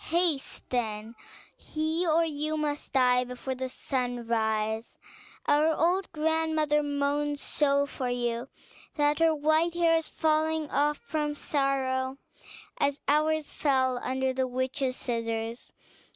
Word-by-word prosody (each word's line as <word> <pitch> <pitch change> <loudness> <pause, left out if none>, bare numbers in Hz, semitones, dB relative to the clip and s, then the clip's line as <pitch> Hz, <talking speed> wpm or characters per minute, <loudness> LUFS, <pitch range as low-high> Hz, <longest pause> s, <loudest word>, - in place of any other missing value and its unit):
Haste, 335 -4 0
then; 220 -2 -2 0.4
he 315 +3 -1
or 330 +1 +4
you 310 0 -2
must 295 -1 -3
die 250 -1 +4
before 250 +1 -5
sunrise. 230 -4 -2 0.5
Our 300 +2 +4
old 360 +4 +1
grandmother 315 -1 +1
moans 290 0 -1
so 280 -1 +2
for 260 -3 -4
you, 240 +1 -2 0.5
that 295 0 +2
her 325 -1 +4
white 315 +3 +2
hair 335 -1 +4
is 325 - -7
falling 315 -1 +1
off 295 +1 +2
from 300 -9 -2
sorrow, 270 -2 0 0.6
as 285 0 +1
ours 305 +1 +2
fell 260 -3 +1
under 260 0 -1
the 260 0 0
witch's 260 +1 -1
scissors. 230 -1 -3
285 Hz, 120 wpm, -28 LUFS, 255-310 Hz, 0.6 s, or